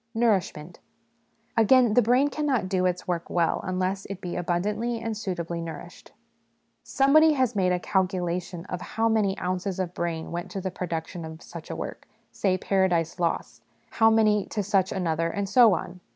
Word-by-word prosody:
Nourishment. 190 Hz, -8 st, 0 dB, 0.8 s
Again, 235 Hz, 0 st, +5 dB
the 245 Hz, -, +5 dB
brain 250 Hz, +5 st, +3 dB
cannot 280 Hz, -10 st, -1 dB
do 185 Hz, -1 st, +1 dB
its 180 Hz, 0 st, -3 dB
work 170 Hz, -1 st, -2 dB
will 170 Hz, -2 st, +1 dB
unless 185 Hz, +1 st, -2 dB
it 195 Hz, -2 st, -6 dB
be 180 Hz, -2 st, -5 dB
abundantly 210 Hz, +7 st, -1 dB
and 225 Hz, -1 st, -3 dB
suitably 170 Hz, -5 st, -4 dB
nourished; 165 Hz, -1 st, -9 dB, 0.7 s
somebody 305 Hz, +3 st, +4 dB
has 255 Hz, -5 st, +1 dB
made 185 Hz, -2 st, +2 dB
a 180 Hz, -, +1 dB
calculation 180 Hz, -2 st, -2 dB
of 180 Hz, -2 st, -5 dB
how 225 Hz, +1 st, -1 dB
many 210 Hz, -4 st, +1 dB
ounces 185 Hz, +1 st, -3 dB
of 180 Hz, -2 st, -2 dB
brain 165 Hz, -2 st, -3 dB
went 175 Hz, +1 st, -4 dB
to 195 Hz, -, -5 dB
the 190 Hz, 0 st, -3 dB
production 170 Hz, -1 st, -5 dB
of 160 Hz, +1 st, -9 dB
such -, -, -10 dB
a -, -, -4 dB
work -, -, -7 dB, 0.2 s
say 185 Hz, -2 st, 0 dB
Paradise 180 Hz, -4 st, 0 dB
Lost 170 Hz, -1 st, -2 dB, 0.3 s
how 225 Hz, 0 st, +4 dB
many 215 Hz, -2 st, +3 dB
to 210 Hz, -, -2 dB
such 195 Hz, -1 st, +1 dB
another, 165 Hz, -2 st, -1 dB
and 200 Hz, +3 st, -3 dB
so 220 Hz, -1 st, +6 dB
on. 175 Hz, +2 st, -6 dB
185 Hz, 170 wpm, -26 LUFS, 175-220 Hz, 0.8 s, so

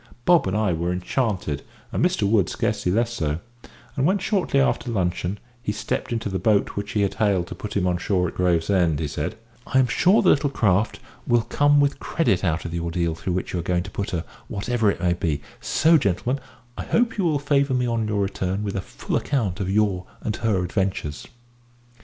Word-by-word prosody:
Bob 175 Hz, -, +5 dB
and 95 Hz, +2 st, 0 dB
I 105 Hz, -4 st, +1 dB
were 85 Hz, +2 st, -1 dB
enchanted, 90 Hz, -, -1 dB, 0.3 s
and -, -, 0 dB
Mr 180 Hz, -, +2 dB
Wood 100 Hz, -3 st, +3 dB
scarcely 90 Hz, -, -1 dB
less 115 Hz, +4 st, +1 dB
so; 80 Hz, -9 st, -1 dB, 0.6 s
and 135 Hz, -, 0 dB
when, 185 Hz, +7 st, +3 dB
shortly 190 Hz, -7 st, +1 dB
after 135 Hz, -2 st, +1 dB
luncheon, 90 Hz, -2 st, -1 dB, 0.2 s
he 105 Hz, -, -2 dB
stepped 110 Hz, +4 st, -3 dB
into 115 Hz, -2 st, -1 dB
the 95 Hz, -1 st, -2 dB
boat 105 Hz, +2 st, +2 dB
which 100 Hz, +3 st, -5 dB
he 105 Hz, -, +1 dB
had 100 Hz, -, 0 dB
hailed 100 Hz, -5 st, +1 dB
to -, -, -5 dB
put 105 Hz, -1 st, -5 dB
him 95 Hz, -, +1 dB
on 90 Hz, -1 st, +1 dB
shore 90 Hz, 0 st, +1 dB
at -, -, -6 dB
Gravesend, 85 Hz, -2 st, +2 dB
he 80 Hz, -, -1 dB
said, 75 Hz, +4 st, -3 dB, 0.3 s
"I -, -, +1 dB
am 130 Hz, -, +6 dB
sure 180 Hz, -, +3 dB
the -, -, +5 dB
little 145 Hz, 0 st, +3 dB
craft 105 Hz, -4 st, +1 dB, 0.3 s
will 120 Hz, -2 st, +3 dB
come 145 Hz, +4 st, +3 dB
with 140 Hz, 0 st, +2 dB
credit 100 Hz, -, 0 dB
out 85 Hz, -2 st, 0 dB
of 85 Hz, -, -4 dB
the 85 Hz, -, -2 dB
ordeal 85 Hz, 0 st, -1 dB
through 90 Hz, +3 st, -3 dB
which 90 Hz, -, -3 dB
you 90 Hz, -, -1 dB
are -, -, -1 dB
going 85 Hz, +1 st, 0 dB
to 95 Hz, -, -9 dB
put 100 Hz, -, -3 dB
her, 85 Hz, -3 st, -2 dB, 0.2 s
whatever 110 Hz, +1 st, 0 dB
it -, -, -1 dB
may 90 Hz, -2 st, +2 dB
be; 80 Hz, -4 st, -1 dB, 0.2 s
so, 160 Hz, +1 st, +4 dB
gentlemen, 120 Hz, +5 st, 0 dB, 0.4 s
I -, -, -3 dB
hope 230 Hz, -2 st, +1 dB
you -, -, +2 dB
will 160 Hz, -4 st, +2 dB
favour 140 Hz, -1 st, +1 dB
me 125 Hz, 0 st, +1 dB
on 115 Hz, -2 st, 0 dB
your 105 Hz, -1 st, 0 dB
return 95 Hz, 0 st, -2 dB
with 100 Hz, -1 st, -3 dB
a 95 Hz, -, -1 dB
full -, -, -5 dB
account 110 Hz, -11 st, 0 dB
of 95 Hz, -2 st, -2 dB
your 100 Hz, -3 st, +1 dB, 0.2 s
and 110 Hz, -, -1 dB
her 105 Hz, -5 st, +1 dB
adventures." 90 Hz, -5 st, -2 dB
100 Hz, 220 wpm, -24 LUFS, 90-125 Hz, 0.6 s, am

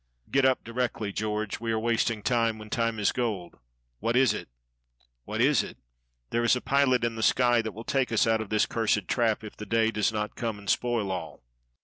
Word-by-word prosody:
"Getup 130 Hz, -1 st, +3 dB
directly, 115 Hz, -3 st, -2 dB
George. 105 Hz, 0 st, -2 dB
We 115 Hz, 0 st, -2 dB
are 110 Hz, -, +1 dB
wasting 115 Hz, -1 st, 0 dB
time 115 Hz, -3 st, +1 dB
when 110 Hz, 0 st, -11 dB
time 115 Hz, -2 st, 0 dB
is 105 Hz, -, +2 dB
gold." 105 Hz, -8 st, -3 dB, 0.4 s
"What 115 Hz, -, 0 dB
is 130 Hz, -1 st, +4 dB
it?" -, -, -6 dB, 0.8 s
"'What -, -, -2 dB
is -, -, +4 dB
it?' -, -, -9 dB, 0.5 s
There 120 Hz, -, +1 dB
is 120 Hz, -, +4 dB
a -, -, -1 dB
pilot 135 Hz, -3 st, +2 dB
in 115 Hz, -1 st, 0 dB
the 110 Hz, -, -5 dB
sky 120 Hz, 0 st, +4 dB
that 110 Hz, -2 st, -5 dB
will 115 Hz, +4 st, -8 dB
take 130 Hz, -1 st, 0 dB
us 110 Hz, -, +3 dB
out 110 Hz, -1 st, +2 dB
of 110 Hz, -, -6 dB
this 110 Hz, -1 st, +2 dB
cursed 105 Hz, -4 st, 0 dB
trap, 115 Hz, -3 st, +1 dB
if 105 Hz, -, -9 dB
the 105 Hz, -, -8 dB
day 115 Hz, +1 st, +2 dB
does 105 Hz, 0 st, +1 dB
not 105 Hz, 0 st, -3 dB
come 115 Hz, -3 st, -3 dB
and 100 Hz, -1 st, -13 dB
spoil 115 Hz, -5 st, 0 dB
all." 90 Hz, -4 st, -6 dB
115 Hz, 215 wpm, -27 LUFS, 105-120 Hz, 0.8 s, is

